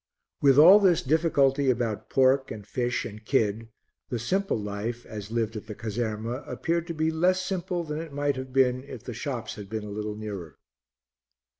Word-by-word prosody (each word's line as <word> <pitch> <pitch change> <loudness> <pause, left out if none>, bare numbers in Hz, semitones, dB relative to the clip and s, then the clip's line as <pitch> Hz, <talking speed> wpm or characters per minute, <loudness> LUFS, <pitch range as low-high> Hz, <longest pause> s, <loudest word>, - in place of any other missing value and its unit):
With 140 -2 +5
all 180 +7 +9
this 185 -5 +3
difficulty 140 -2 +2
about 120 -4 -1
pork 135 0 +3
and 105 -2 -7
fish 120 +2 -1
and 110 -1 -8
kid, 110 -2 0 0.4
the 120 - -2
simple 190 - 0
life, 105 +4 -4
as 105 -2 -7
lived 115 -1 -1
at 110 0 -7
the 105 - -6
caserma, 115 +3 -3
appeared 170 0 -1
to 170 - -4
be 160 +1 +1
less 180 +3 +2
simple 185 -1 -2
than 150 -1 -4
it 165 -2 -8
might 145 0 0
have 130 0 -6
been 130 -1 +2
if 130 -5 -9
the 125 - -6
shops 120 -1 -4
had 100 -2 -8
been 110 0 -4
a 105 - -7
little 105 0 -4
nearer. 100 -8 -7
125 Hz, 185 wpm, -27 LUFS, 110-150 Hz, 0.4 s, all